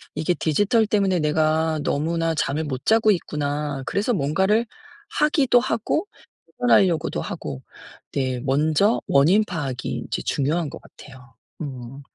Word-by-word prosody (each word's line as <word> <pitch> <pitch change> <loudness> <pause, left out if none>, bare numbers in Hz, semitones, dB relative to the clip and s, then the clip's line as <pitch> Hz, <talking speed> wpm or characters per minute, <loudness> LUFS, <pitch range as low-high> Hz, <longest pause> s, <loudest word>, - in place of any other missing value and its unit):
이게 155 +3 0
디지털 205 +8 +2
때문에 195 -4 +1
내가 155 +1 +1
너무나 165 +2 0
잠을 150 +1 -1
못 135 -1 -5
자고 220 -1 +4
있구나.' 145 -5 -2
그래서 200 - 0
뭔가를 190 +8 +1 0.4
하기도 290 -5 +3
하고 245 - -1 0.5
해결하려고도 190 -9 +3
하고 70 -3 -6 0.5
네 130 -2 -1
먼저 155 - +2
원인 170 +10 +4
파악이 145 -9 -4
이제 - - -3
중요한 150 +3 0
것 - - -10
같아요. 130 -2 -16 0.3
음. 135 -2 -7
155 Hz, 285 characters per minute, -23 LUFS, 140-200 Hz, 0.5 s, 자고